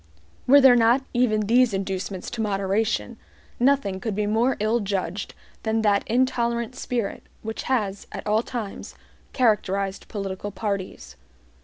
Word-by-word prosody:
Were 280 +3 +8
there 265 -3 +7
not 240 +3 +4
even 240 -4 +2
these 230 +1 +3
inducements 190 -1 -4
to 235 - -3
moderation, 195 - -1 0.4
nothing 245 -7 +2
could 210 0 -3
be 210 0 0
more 225 +5 +1
ill 215 +3 +1
judged 195 -2 -3 0.3
than 220 0 0
that 205 -2 +3
intolerant 235 -1 0
spirit 240 -5 -3 0.2
which 220 0 -4
has, 205 -6 -1
at - - -7
all 215 +1 +2
times, 230 -5 -6 0.4
characterized 200 -5 0
political 195 -1 -4
parties. 190 - -5
215 Hz, 135 wpm, -24 LUFS, 195-240 Hz, 0.4 s, Were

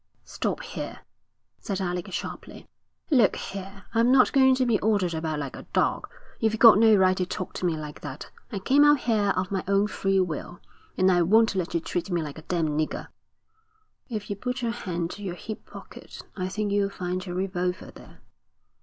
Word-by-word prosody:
'Stop - - -3
here,' - - -6 0.6
said 195 -2 -3
Alec 180 -2 -3
sharply. - - -7 0.4
'Look 245 -8 +4
here, 195 0 -7
I'm 230 +2 +3
not 260 -1 +5
going 265 -1 +5
to 255 0 +1
be 230 -4 +2
ordered 200 -5 +1
about 160 -1 -2
like 140 -3 -5
a - - -11
dog. - - +1 0.3
You've 220 0 +1
got 225 -2 +8
no 220 -1 +6
right 185 -1 +4
to 180 - 0
talk 185 - -5
to 180 - -1
me 165 -2 -1
like 150 -1 -8
that. 145 -1 -8 0.2
I 205 - -3
came 270 +9 +4
out 295 -2 +5
here 215 -4 +1
of 185 0 -1
my 190 -2 -1
own 200 +1 +3
free 195 -2 0
will, 175 0 -3 0.4
and 185 0 +4
I 175 -1 +3
won't 220 +6 +4
let 185 -3 -2
you - - +3
treat 175 +3 -3
me 175 -3 0
like 150 0 -7
a - - -11
damned 165 -1 -1
nigger.' 155 - -3 1.0
'If 215 -4 -5
you - - -1
put 250 +4 -4
your 230 - 0
hand 175 -7 -3
to 205 - -9
your 185 -4 -4
hip 215 +4 -8
pocket - - -11
I 185 -1 -3
think 210 +1 -2
you'll 200 -1 +1
find 185 -1 -4
your 180 -1 -6
revolver 180 -1 -2
there.' - - -15
195 Hz, 200 wpm, -26 LUFS, 175-220 Hz, 1.0 s, got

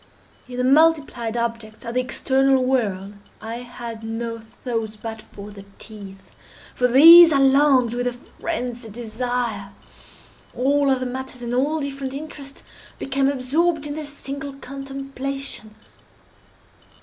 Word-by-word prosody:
In 250 0 -8
the 250 - 0
multiplied 275 -5 +3
objects 230 -2 -4
of 235 - -4
the 250 - +1
external 265 +1 +2
world 205 -7 -1 0.3
I 225 +1 -6
had 235 -2 -8
no 230 +1 -4
thoughts 225 -1 -5
but 220 +1 -7
for 205 0 -11
the 200 -1 -11
teeth. 200 -3 -11 0.4
For 250 - +2
these 330 +7 +10
I 285 - +3
longed 270 -3 +4
with 245 0 -1
a 245 - -1
phrenzied 245 -3 -6
desire. 235 -3 -3 0.8
All 280 +2 +2
other 260 -1 +1
matters 255 0 -5
and 240 0 -3
all 295 +5 +1
different 275 -1 -4
interests 280 -2 -9 0.3
became 270 0 0
absorbed 295 +4 0
in 290 - -4
their 310 +1 -5
single 280 -1 -6
contemplation. 275 -4 -6
255 Hz, 130 wpm, -22 LUFS, 230-275 Hz, 0.8 s, these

